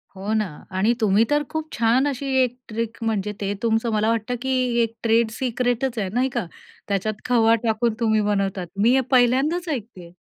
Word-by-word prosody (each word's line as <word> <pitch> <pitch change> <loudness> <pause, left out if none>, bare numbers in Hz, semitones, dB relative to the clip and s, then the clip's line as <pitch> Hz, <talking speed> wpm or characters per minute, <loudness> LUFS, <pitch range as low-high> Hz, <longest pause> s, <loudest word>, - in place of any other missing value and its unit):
हो 200 +3 -3
ना. 215 -1 +1 0.3
आणि 210 +6 +3
तुम्ही 210 0 +4
तर 295 0 +2
खूप 315 -1 -4
छान 235 +4 +2
अशी 280 -1 -3 0.2
एक 245 0 -3
ट्रिक 230 +1 -4
म्हणजे 210 -2 -1
ते 200 0 -1
तुमचं 225 0 +1
मला 215 +1 +2
वाटतं 230 +2 -1
की 265 - -3 0.3
एक 230 0 -3
ट्रेड 230 0 +3
सिक्रेटच 245 +1 -1
आहे 190 -2 -2
नाही 255 +2 +1
का? 240 -5 -3 0.4
त्याच्यात 205 +1 -2
खवा 230 -2 +4
टाकून 225 0 +1
तुम्ही 220 -2 +2
बनवतात. 195 -3 -1
मी 230 +5 +4
हे 265 - +4
पहिल्यांदाच 270 +8 +2
ऐकतेय. 210 - -6
230 Hz, 180 wpm, -23 LUFS, 215-250 Hz, 0.4 s, तुम्ही